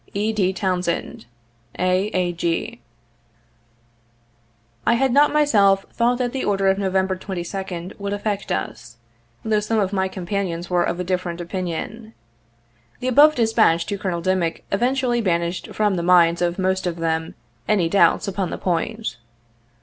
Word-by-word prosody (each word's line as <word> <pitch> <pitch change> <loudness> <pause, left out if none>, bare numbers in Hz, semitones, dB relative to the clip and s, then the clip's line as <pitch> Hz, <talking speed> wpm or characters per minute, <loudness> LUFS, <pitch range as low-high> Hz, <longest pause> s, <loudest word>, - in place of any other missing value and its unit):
"E. 215 +2 0
D. 190 -4 +1
TOWNSEND. 180 - -2 0.2
« 115 0 -24
A. 185 +2 +1
A. 180 -4 -1
G." 165 -7 -2 2.0
I - - +3
had 265 +1 +1
not 290 +2 +5
myself 205 -10 +3
thought 240 +1 +2
that 245 -1 -1
the 265 - -2
order 195 -1 +2
of 190 +1 +1
November 190 -1 0
22d 185 0 -6
would 200 0 -4
affect 205 0 -3
us, 115 +4 -4 0.5
though 215 -1 +2
some 215 +2 -1
of 200 -2 0
my 190 -1 +1
companions 185 -2 -4
were 175 -1 +3
of 175 +1 -2
a - - -1
different 180 -1 -2
opinion. 185 +5 -5 0.8
The 255 - -1
above 295 +4 +6
dispatch 220 -8 +3
to 200 - -3
Colonel 175 -3 -2
Dim 185 +1 +1
ick 165 -1 -3
effectually 245 +2 +1
banished 170 -3 -1
from 210 -2 0
the - - -1
minds 170 -1 +4
of 175 0 0
most 190 -1 0
of 175 - -2
them 160 -1 -2 0.3
any 195 -6 +2
doubts 200 +3 +3
upon 195 -1 -2
the - - -4
point. 215 +6 -2
190 Hz, 155 wpm, -22 LUFS, 175-215 Hz, 2.0 s, above